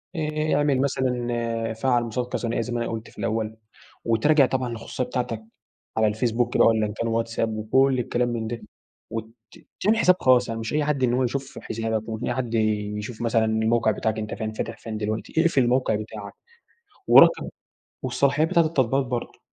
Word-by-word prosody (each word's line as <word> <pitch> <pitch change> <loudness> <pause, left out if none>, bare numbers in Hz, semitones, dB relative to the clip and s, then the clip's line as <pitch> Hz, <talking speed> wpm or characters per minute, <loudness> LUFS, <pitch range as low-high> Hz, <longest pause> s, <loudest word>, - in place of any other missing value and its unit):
آآ، 155 -1 -1
اعمل 145 -2 +2
مثلًا، 120 -4 -1
فعّل 120 +1 +1
مُصادقة 120 +2 -3
ثنائية 115 -1 -1
زي 120 +1 -4
ما 120 - -1
أنا - - -4
قلت 115 0 -6
في - - -21
الأول، 110 +1 -2 0.5
وتراجع 135 +6 +4
طبعًا 130 -1 -1
الخصوصية 115 +2 -4
بتاعتك 125 -3 -3 0.5
على 110 - +4
الفيس 110 +3 0
بوك 120 +1 0
والّا 110 -1 +4
إن 105 - -6
كان 115 +2 -3
واتس 115 0 -2
اب 110 -1 0
وكُلّ 130 +4 +2
الكلام 120 +1 0
من 115 -2 -3
ده، 115 0 -5 0.5
وت 115 -1 -3 0.6
تعمل 210 +3 +3
الحساب 185 -5 +4
خاص 125 -1 +4
يعني 115 0 -3
مش 110 +4 -4
أي 150 0 +2
حد 140 -3 0
إن 120 -1 +3
هو 130 +1 +2
يشوف 135 +2 -3
حسابك، 110 0 -3
ومش 110 +1 -4
أي 120 - 0
حد 120 -2 -3
يشوف 105 +1 -1
مثلًا 115 -1 +2
الموقع 110 +1 +2
بتاعك 110 +1 -1
أنت 105 0 -4
فين 110 -1 -4
فاتح - - -4
فين 110 -2 -6
دلوقتي، 110 +1 -3
اقفل 165 -5 +3
الموقع 125 -2 +2
بتاعك، 105 -1 -7 0.8
ورقم - - +7 0.6
والصلاحيات 140 +3 +2
بتاعة 170 - +4
التطبيقات 135 -3 +1
برضو. 120 -1 -4
115 Hz, 185 wpm, -24 LUFS, 110-130 Hz, 0.8 s, ورقم